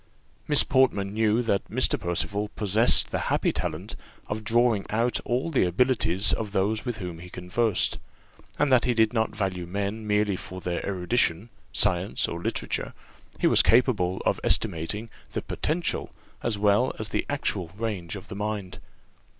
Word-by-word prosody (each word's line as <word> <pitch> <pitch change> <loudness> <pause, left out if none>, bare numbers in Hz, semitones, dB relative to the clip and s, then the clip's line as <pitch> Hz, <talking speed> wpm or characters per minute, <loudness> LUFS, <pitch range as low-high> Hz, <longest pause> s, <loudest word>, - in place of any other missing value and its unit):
Miss 150 -2 +6
Portman 115 -7 +2
knew 110 +2 +2
that 100 -4 -1
Mr. - - +1
Percival 100 +4 -1
possessed 110 +3 +3
the - - -1
happy - - +1
talent 85 +5 -4 0.3
of 110 +1 -4
drawing 115 -1 +2
out 115 +3 +1
all 130 +7 -1
the 140 - +3
abilities 95 0 +2
of 105 -3 -3
those 105 +4 0
with 120 -3 -3
whom 90 -5 -6
he 90 +1 -10
conversed, 95 +4 0 0.6
and 140 - +1
that 125 -2 +5
he 125 -1 +1
did 110 0 +3
not 110 -2 0
value 95 -4 -2
men 100 +4 -3
merely 105 -1 +1
for 95 0 -8
their 90 -1 -3
erudition, 95 +1 0 0.2
science, 95 0 +2
or 85 - -5
literature; - - -3 0.4
he - - 0
was - - +6
capable 105 -7 +2
of - - +1
estimating 105 +8 0 0.2
the - - -3
potential 160 +1 -2 0.3
as 115 -3 0
well 105 +5 +2
as 110 - -4
the - - -1
actual 105 -10 -1
range 105 -6 -4
of 100 0 -9
the - - -7
mind. 105 -2 -4
105 Hz, 160 wpm, -26 LUFS, 95-115 Hz, 0.6 s, Miss